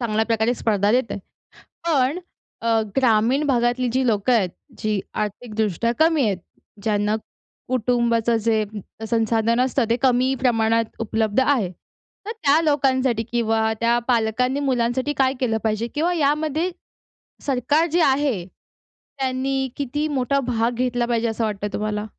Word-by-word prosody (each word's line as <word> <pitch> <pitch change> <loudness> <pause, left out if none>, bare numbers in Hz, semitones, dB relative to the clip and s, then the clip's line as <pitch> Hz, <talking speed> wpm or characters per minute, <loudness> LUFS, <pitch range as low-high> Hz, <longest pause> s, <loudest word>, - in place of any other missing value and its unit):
चांगल्या 220 -2 0
प्रकारे 230 +1 +1
स्पर्धा 205 -3 +1
देत 250 -2 +1
आहे. - - -3 0.7
पण 290 +1 +2 0.4
अ, 225 -1 +2
ग्रामीण 250 +2 +3
भागातली 245 0 +1
जी 260 0 +1
लोकं 220 +2 +2
आहेत 200 -6 +2 0.3
जी 215 -2 -1
आर्थिकदृष्ट्या 215 0 -2
कमी 320 -1 +4
आहेत. 200 -4 0 0.5
ज्यांना 210 -1 +1 0.5
कुटुंबाचं 235 -2 +1
जे 220 0 +1 0.5
संसाधन 225 +1 +1
असतं 260 -1 +1
ते 230 - +3
कमी 255 0 +3
प्रमाणात 230 -2 +2
उपलब्ध 220 0 0
आहे, 260 -8 +2 0.6
तर 440 - -4
त्या 320 -8 +2
लोकांसाठी 260 -6 +1
किंवा 225 -1 +1
त्या 235 +1 +3
पालकांनी 250 +3 +1
मुलांसाठी 260 0 0
काय 265 -1 +3
केलं 230 -4 +1
पाहिजे? 220 +1 0
किंवा 335 +4 +1
यामध्ये 310 +2 +1 0.8
सरकार 280 +4 +2
जे 345 - +3
आहे, 265 - +2
त्यांनी 265 +7 -5
किती 290 +2 -2
मोठा 275 -1 0
भाग 230 -1 +1
घेतला 245 0 0
पाहिजे 235 -1 0
असं 225 0 -2
वाटतं 205 -1 -2
तुम्हाला? 210 0 -2
240 Hz, 135 wpm, -22 LUFS, 220-265 Hz, 0.8 s, कमी